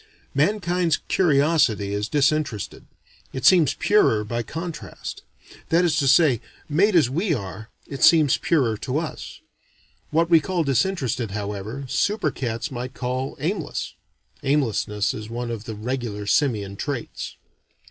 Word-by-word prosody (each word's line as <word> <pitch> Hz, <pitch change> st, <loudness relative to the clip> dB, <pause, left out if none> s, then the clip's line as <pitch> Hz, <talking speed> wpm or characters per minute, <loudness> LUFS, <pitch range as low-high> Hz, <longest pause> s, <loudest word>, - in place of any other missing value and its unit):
Mankind's 175 Hz, +1 st, +1 dB
curiosity 140 Hz, -, +2 dB
is 105 Hz, +1 st, -2 dB
disinterested; 145 Hz, -6 st, 0 dB, 0.5 s
it 130 Hz, -1 st, -4 dB
seems 170 Hz, -5 st, +5 dB
purer 115 Hz, -, +3 dB
by 115 Hz, +3 st, -3 dB
contrast. 165 Hz, +7 st, -7 dB, 0.5 s
That 170 Hz, +2 st, +4 dB
is 165 Hz, -, +1 dB
to 140 Hz, -, +2 dB
say, 135 Hz, -4 st, +5 dB, 0.3 s
made 185 Hz, +7 st, +3 dB
as 160 Hz, -8 st, +5 dB
we 165 Hz, -, 0 dB
are, 105 Hz, 0 st, -7 dB, 0.2 s
it 140 Hz, -, -8 dB
seems 155 Hz, -5 st, +6 dB
purer 125 Hz, -10 st, +1 dB
to 130 Hz, +6 st, -3 dB
us. 160 Hz, -1 st, -5 dB, 0.7 s
What 165 Hz, +2 st, +2 dB
we 165 Hz, -1 st, +6 dB
call 175 Hz, +2 st, -1 dB
disinterested, 135 Hz, -, 0 dB
however, 105 Hz, +6 st, -5 dB
super 200 Hz, -, 0 dB
cats 120 Hz, +3 st, -4 dB
might 125 Hz, +1 st, -6 dB
call 130 Hz, +1 st, -3 dB
aimless. 170 Hz, +2 st, -3 dB, 0.5 s
(Aimlessness 110 Hz, -7 st, 0 dB
is 110 Hz, 0 st, -7 dB
one 120 Hz, +1 st, -4 dB
of 115 Hz, -2 st, -6 dB
the 110 Hz, -, -6 dB
regular 110 Hz, -2 st, -4 dB
simian 105 Hz, -6 st, +1 dB
traits.) 140 Hz, -2 st, -5 dB
135 Hz, 135 wpm, -23 LUFS, 115-160 Hz, 0.7 s, seems